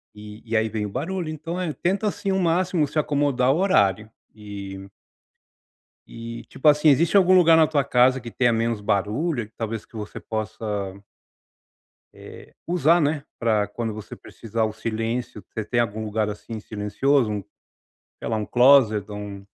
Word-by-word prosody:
E 105 +1 -11
e 115 -1 0
aí 110 0 +1
vem 110 -1 -3
o - - -5
barulho 165 - -3
então, 160 +3 -5
eh, 170 -4 -2
tenta 195 +7 -1
assim 200 -1 -2
ao 190 - +1
máximo 175 -2 +1
se 155 - -1
acomodar 140 -3 +1
o - - -1
horário 105 - +2 0.2
e 100 -2 -8 1.2
E, 115 0 -8
tipo 135 - -5
assim, 150 +1 +5
existe 160 +6 +4
algum 185 -1 +6
lugar 165 -2 +6
na 160 -1 +6
tua 145 -3 0
casa 130 0 +3
que 120 -1 -8
tenha 120 0 +2
menos 115 -1 0
barulho 110 - -1
que - - -36
talvez 115 -1 -4
que - - -31
você 105 -1 -6
possa 110 0 -5 1.6
eh, - - -13
usar 170 0 +3
né 145 -1 0 0.2
pra 110 -3 +2
quando 110 +1 -4
você 110 -1 -8
precisar 115 0 -4
o 110 - -2
silêncio 115 +2 -4
você 110 - -4
tem 120 +3 0
algum 110 -1 -2
lugar 105 0 -1
assim 110 +1 -7
silencioso? 105 +1 0 0.8
Sei - - -6
lá, 110 - -1
um 105 - -3
closet 120 -5 +5
ou 105 - -6
um 100 -1 -8
115 Hz, 170 wpm, -23 LUFS, 105-150 Hz, 1.6 s, algum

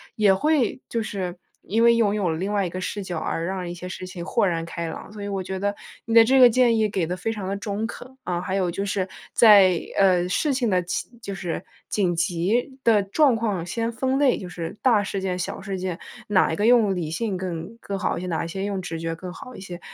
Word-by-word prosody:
也 210 -3 +4
会 280 +2 +1
就 230 - -2
是 190 -4 -4 0.3
因 225 +4 +1
为 235 0 +6
拥 215 -3 +2
有 205 -3 0
了 160 -1 -1
另 195 +4 -2
外 200 -2 +1
一 175 - -3
个 185 +2 -5
视 205 - -3
角， 175 -2 -4
而 165 +1 -2
让 185 -1 -3
一 - - -4
些 180 +1 -8
事 185 0 -6
情 180 -2 -7
豁 195 - +1
然 165 -2 -1
开 170 0 -5
朗。 175 - -8
所 205 -1 -7
以 205 - -4
我 195 -1 -2
觉 190 +1 -4
得， 205 +1 0 0.3
你 230 - -3
的 230 0 +8
这 265 +3 +4
个 250 -2 +9
建 235 -1 +3
议 215 -1 +2
给 185 -5 -1
得 180 - -2
非 225 +4 -2
常 205 -4 -5
地 195 - -1
中 205 +2 -3
肯。 - - -8 0.2
啊， 175 -1 -1
还 190 +1 -3
有 185 -3 +1
就 195 +3 -3
是， 195 -2 -1 0.3
在， 195 -6 +7 0.2
呃， 180 -2 +4
事 280 - +1
情 250 -4 0
的 180 -2 +2
起 175 - -3
就 200 -2 -5
是 175 -3 -4 0.2
紧 185 -4 +1
急 185 +10 0
的 220 -3 +5
状 255 +7 +3
况 205 -7 -1
先 230 +6 -2
分 260 +4 0
类， 275 -3 +4
就 180 - -7
是 165 -1 -6
大 235 -5 +4
事 195 0 -3
件、 185 -1 -2
小 185 - -4
事 190 -1 -4
件， 180 -2 -3 0.3
哪 190 -5 +3
一 - - -1
个 205 - +1
用 230 -4 +5
理 170 -4 -3
性 190 +3 -2
更 180 +3 -5
更 200 -3 -4
好 - - -1
一 - - -4
些， 185 - -5
哪 165 -2 -1
一 - - -4
些 190 +3 -3
用 200 -2 -2
直 165 -2 -5
觉 165 0 -3
更 180 +1 -8
好 255 +6 -10
一 - - -9
些。 180 -2 -8
195 Hz, 280 characters per minute, -24 LUFS, 180-220 Hz, 0.3 s, 个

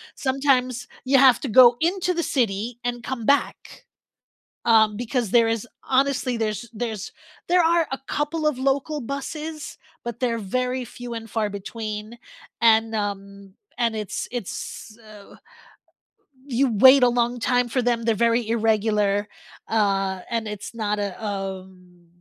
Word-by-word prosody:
Sometimes 260 -2 0 0.2
you 270 +1 +4
have 260 -3 +6
to 275 - -3
go 240 +2 +7
into 360 +2 +1
the 340 -1 -1
city 230 -1 -1
and 240 -1 -3
come 245 -3 -4
back, 280 +3 0 0.8
um, 220 -2 +4
because 240 -2 -2
there 230 -2 +5
is 225 0 -2 0.2
Honestly, 265 -1 +1
there's 220 +1 -3
there's 220 -2 -4 0.4
there 355 +1 +4
are 335 0 +3
a 270 - -2
couple 305 +2 -1
of 300 -4 +1
local 275 +3 0
buses, 300 +4 -6 0.3
but, 235 -1 -6
they're 235 -3 0
very 250 +5 -2
few 245 0 -9
and 225 -1 -7
far 215 -1 -1
between, 215 +2 -6 0.4
and, 225 -1 +4
um 200 -2 -5 0.2
and 230 -2 0
it's 210 -3 -4
it's, 220 -1 -6
uh, 215 -3 -15 1.1
you 260 0 +1
wait 260 +5 +7
a - - +7
long 240 0 0
time 245 +1 +1
for 255 +2 0
them, 240 -1 +1
they're 225 -1 +1
very 230 +1 +2
irregular, 210 -2 +1 0.4
uh, 195 -3 +1
and 230 -1 -1
it's 210 +1 -7
not 210 -2 -1
a, 200 -1 -2
um, 190 -3 -7
230 Hz, 145 wpm, -23 LUFS, 210-255 Hz, 1.1 s, go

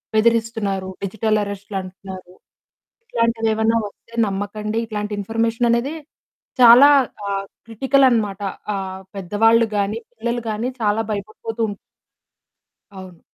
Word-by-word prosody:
బెదిరిస్తున్నారు, 220 -4 +1
డిజిటల్ 215 +2 0
అరెస్ట్‌లంటున్నారు, 190 -2 -7 0.7
ఇట్లాంటివేమైనా 225 - +1
వస్తే 230 +3 -18
నమ్మకండి. 205 +2 -3
ఇట్లాంటి 210 -1 -4
ఇన్ఫర్మేషన్ 225 +3 0
అనేది 250 +6 0 0.7
చాలా 245 +3 +9 0.4
ఆహ్, 195 0 -2 0.2
క్రిటికల్ 265 +5 +3
అన్నమాట. 210 -5 0 0.3
ఆహ్, 190 -1 -5
పెద్దవాళ్ళు 225 +5 +3
గాని, 205 +2 0 0.2
పిల్లలు 235 +1 -2
గాని 220 +3 -2
చాలా 210 +1 +2
భయపడిపోతుం 215 +2 -3 1.2
అవును. 185 -3 -11
215 Hz, 95 wpm, -21 LUFS, 200-230 Hz, 1.2 s, చాలా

